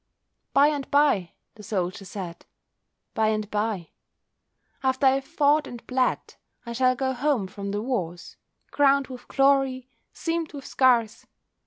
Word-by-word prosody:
"By 280 +2 +5
and 290 -3 -3
bye," 280 - +2 0.2
the 215 - -14
soldier 195 -2 -3
said—"by 190 +3 -7
and 215 -1 -1
bye, 210 -5 -2 0.9
After 260 +1 +1
I - - +8
have 270 +1 0
fought 300 -1 +2
and 240 -1 -10
bled, 255 0 -1 0.3
I 235 - -5
shall 255 +1 +3
go 265 0 -1
home 260 -5 0
from 200 +1 -7
the 205 +1 -2
wars, 180 -9 -4 0.4
Crowned 280 -1 +3
with 250 -1 -10
glory, 270 -2 +2 0.2
seamed 330 -1 -3
with 280 -2 -8
scars. 235 -4 +2
255 Hz, 140 wpm, -25 LUFS, 210-275 Hz, 0.9 s, I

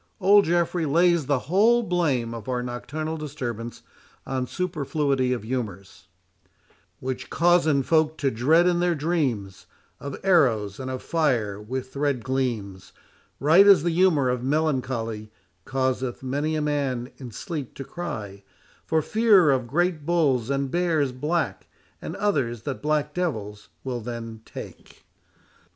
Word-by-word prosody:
Old 200 +1 +6
Geoffrey 170 -1 +1
lays 170 0 +3
the 140 - +2
whole 220 - +4
blame 145 - 0
of 115 0 -7
our 125 -1 -1
nocturnal 155 +6 -4
disturbance 120 -6 -6 0.4
on 130 -1 -2
superfluity 145 -6 -1
of 125 -4 -2
humours, 110 -6 -5 0.9
'Which 130 0 -5
causen 170 -5 +3
folk 160 +1 +2
to 140 -3 0
dred 155 +10 +3
in 175 -1 +2
their 175 -1 +2
dreams 135 - -2 0.3
Of 140 -1 -6
arrowes, 120 - +2
and 130 0 -5
of 130 -1 -5
fire 120 -11 0
with 130 +4 -6
red 140 -4 0
gleams, 110 -8 -3 0.5
Right 165 +8 +6
as 190 -7 +7
the 170 - +1
humour 165 -6 +3
of 125 -1 -1
melancholy 130 -7 -1 0.3
Causeth 130 -1 -2
many 145 +4 -1
a 155 - -1
man 135 -4 -1
in 130 -3 -8
sleep 145 - -6
to 135 - -6
cry 110 - -6 0.4
For 160 -1 +1
fear 210 -8 +4
of 130 -3 0
great 170 +3 0
bulls 145 -8 +1
and 140 -1 -1
bears 165 -6 +1
black, 150 +7 -2 0.3
And - - -6
others 125 - -1
that 140 -3 -4
black 150 0 0
devils 105 - -4
will 125 -2 -3
them 115 -1 -7
take. - - -11
140 Hz, 140 wpm, -25 LUFS, 120-165 Hz, 0.9 s, as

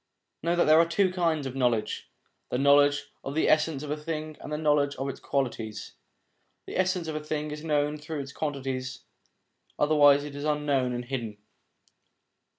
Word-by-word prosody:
Know 170 +2 +1
that 175 - +4
there 155 +1 +6
are 165 - +5
two 185 +3 +2
kinds 165 -5 0
of 130 -1 -5
knowledge: 120 -4 0 0.4
the - - -1
knowledge 145 +1 +4
of 135 - -5
the 160 - +2
essence 155 -2 +2
of 150 - -5
a - - +1
thing, 155 0 -5
and - - -8
the 150 - -1
knowledge' 145 -2 +2
of 135 - -3
its 135 - -5
qualities. 115 -6 -3 0.7
The - - -7
essence 185 -2 0
of 155 - -3
a 155 - -4
thing 150 0 -3
is 150 +1 -6
known 150 -1 0
through 150 0 -5
its 140 0 -9
qualities, 135 -3 -4 0.7
otherwise 145 -1 +5
it 145 -1 -7
is 145 - -5
unknown 145 -4 +1
and 120 0 -4
hidden. 120 -5 -4
145 Hz, 180 wpm, -27 LUFS, 135-155 Hz, 0.7 s, there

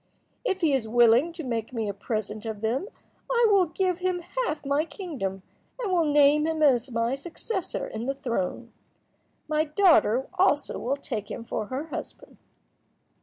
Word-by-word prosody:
If 385 -6 -1
he 315 -4 +3
is 255 -5 0
willing 240 +6 +5
to 335 -1 -6
make 230 -4 -3
me 225 -3 -2
a 200 - -2
present 215 +1 -4
of 215 -2 -5
them 240 - -1 0.4
I 480 -1 +4
will 385 -3 +5
give 365 +2 -1
him 365 -1 -1 0.3
half 300 -1 -4
my 280 +2 +2
kingdom, 285 - -5 0.4
and 440 -6 -2
will 340 -2 +3
name 295 +1 +5
him 320 -1 0
as 260 -3 +4
my 230 +1 0
successor 345 +7 -4
in 225 +3 -5
the 275 - -1
throne. 235 -3 -3 0.7
My 310 0 +1
daughter 295 - +4
also 295 -6 +2
will 270 +4 -1
take 210 -6 -5
him 230 - -5
for 215 -2 -3
her 280 +7 -4
husband." - - -8
280 Hz, 170 wpm, -26 LUFS, 230-335 Hz, 0.7 s, willing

